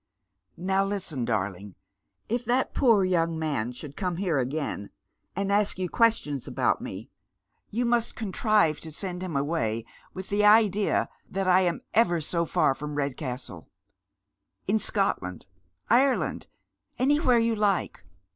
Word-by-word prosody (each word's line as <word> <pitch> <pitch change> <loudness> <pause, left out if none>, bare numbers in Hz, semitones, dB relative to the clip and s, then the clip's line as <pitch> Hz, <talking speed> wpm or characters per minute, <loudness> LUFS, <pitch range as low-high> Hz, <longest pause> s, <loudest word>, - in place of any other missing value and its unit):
" - - -47
Now 195 +1 +3
listen, 180 -10 -3
darling. 100 -3 -3 0.5
If 240 +2 -1
that 245 +3 +1
poor 230 -7 +4
young 165 -3 +1
man 145 -8 -2
should 140 +3 -10
come 180 -2 -2
here 175 -6 0
again 130 -5 -3 0.5
and 200 +1 -1
ask 205 -1 +1
you 185 -1 -2
questions 160 - +1
about - - 0
me, - - -7 0.6
you 240 +4 -1
must 235 -1 +1
contrive 210 -5 +1
to 160 - -8
send 180 +2 -4
him 180 -5 -4
away 115 -7 -1 0.3
with 190 0 -7
the 205 +1 +1
idea 210 -1 +4 0.2
that 195 0 -2
I 185 0 +6
am 175 -2 0
ever 175 -7 +3
so 170 +2 -1
far 135 - +2
from 150 +1 -6
Ked 140 -2 -1
castle. 130 -3 -6 1.0
In 215 +3 +2
Scotland, 100 - -1 0.4
Ireland, 265 +2 +2 0.5
anywhere 270 -2 +3
you 230 0 +2
like. 205 -3 0
185 Hz, 145 wpm, -27 LUFS, 145-210 Hz, 1.0 s, I